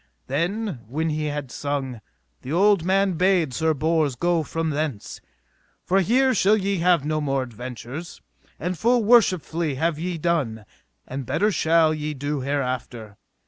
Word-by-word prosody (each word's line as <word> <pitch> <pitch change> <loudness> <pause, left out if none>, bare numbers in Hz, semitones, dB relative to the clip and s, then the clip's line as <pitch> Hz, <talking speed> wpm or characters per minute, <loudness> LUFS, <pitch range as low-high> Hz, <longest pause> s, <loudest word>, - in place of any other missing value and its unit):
Then 175 - -2
when 160 +6 -1
he 155 0 -2
had 145 -3 -4
sung, 135 -5 -3 0.4
the 130 - -7
old 195 +1 +4
man 195 +1 +2
bade 175 -4 +2
Sir 160 +3 +1
Bors 155 -2 +1
go 175 +3 +1
from 160 +1 -2
thence. 145 -7 -4 0.6
For 190 +3 +3
here 255 +7 +3
shall 210 0 +4
ye 200 -1 -1
have 170 -4 +3
no 155 0 -1
more 135 -2 0
adventures; 125 +6 -8 0.4
and 180 +2 -2
full 235 +5 +2
worshipfully 180 - +3
have 160 +2 -1
ye 175 +1 -3
done, 145 -10 -1 0.4
and 130 -1 -6
better 210 +1 +1
shall 160 -3 +3
ye 150 -1 -4
do 145 +2 -3
hereafter. 125 -6 -3
160 Hz, 150 wpm, -23 LUFS, 140-180 Hz, 0.6 s, old